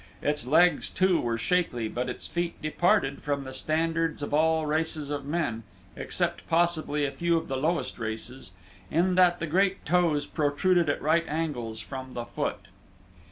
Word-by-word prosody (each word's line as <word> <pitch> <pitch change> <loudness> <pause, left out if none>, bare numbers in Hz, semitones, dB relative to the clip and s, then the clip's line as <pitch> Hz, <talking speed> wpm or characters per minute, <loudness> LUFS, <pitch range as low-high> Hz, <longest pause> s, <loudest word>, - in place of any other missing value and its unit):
Its 145 -3 0
legs 175 +6 +4
too 185 -2 +2
were 115 -1 -1
shapely 125 -7 0
but 125 +3 -3
its - - -6
feet 175 0 -3
departed 155 -2 +1
from 140 -1 -2
the 130 -1 -8
standards 165 +2 -1
of 145 - -4
all 160 +1 +3
races 155 -1 -1
of 145 -1 -3
men, 145 -7 -1 0.3
except - - -2
possibly 165 -3 +1
a 140 - -2
few 170 +1 +1
of 165 - -3
the 135 - -2
lowest 155 +3 -1
races, 110 -1 -5 0.4
in 175 +4 +2
that 180 -1 +5
the 170 - -2
great 190 +4 +1
toes 170 -5 +2
protruded 155 +3 +1
at 145 - 0
right 165 +3 +2
angles 125 -9 -3
from 130 +2 -8
the 120 - -4
foot. - - -3
155 Hz, 165 wpm, -27 LUFS, 135-170 Hz, 0.4 s, that